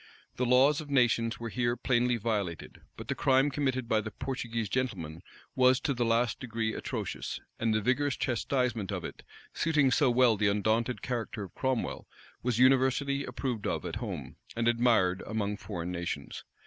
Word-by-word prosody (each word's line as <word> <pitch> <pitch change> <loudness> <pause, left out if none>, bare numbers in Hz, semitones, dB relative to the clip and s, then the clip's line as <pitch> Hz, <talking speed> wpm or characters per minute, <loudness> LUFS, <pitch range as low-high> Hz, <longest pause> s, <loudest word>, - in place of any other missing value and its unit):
The 125 - 0
laws 135 +5 +5
of 150 - -10
nations 120 -4 +2
were 115 0 -4
here 120 0 0
plainly 125 -1 +2
violated; 100 -6 -3 0.2
but - - -8
the - - 0
crime 135 +2 +3
committed 130 -4 -1
by 110 -2 +2
the 110 - -5
Portuguese 115 -1 -3
gentleman 95 -9 -3 0.3
was 130 0 +5
to 140 - 0
the 120 -1 0
last 115 +1 +1
degree 115 -3 -2
atrocious; - - -4 0.2
and 115 -1 +1
the 110 0 +1
vigorous 130 +5 +1
chastisement 120 -5 -1
of - - -3
it, - - -8 0.3
suiting 150 -5 +2
so 140 +1 +4
well 120 -2 +4
the 105 +1 +2
undaunted 110 +4 0
character 115 -4 -3
of 95 - -10
Cromwell, 130 -3 -2 0.3
was 120 -2 0
universally 135 +2 +3
approved 125 -3 -3
of - - -2
at - - -3
home, - - -6 0.2
and 115 0 0
admired 115 -6 +3
among 105 -1 -1
foreign 90 -4 -5
nations. 85 -5 -5
120 Hz, 170 wpm, -30 LUFS, 110-130 Hz, 0.3 s, laws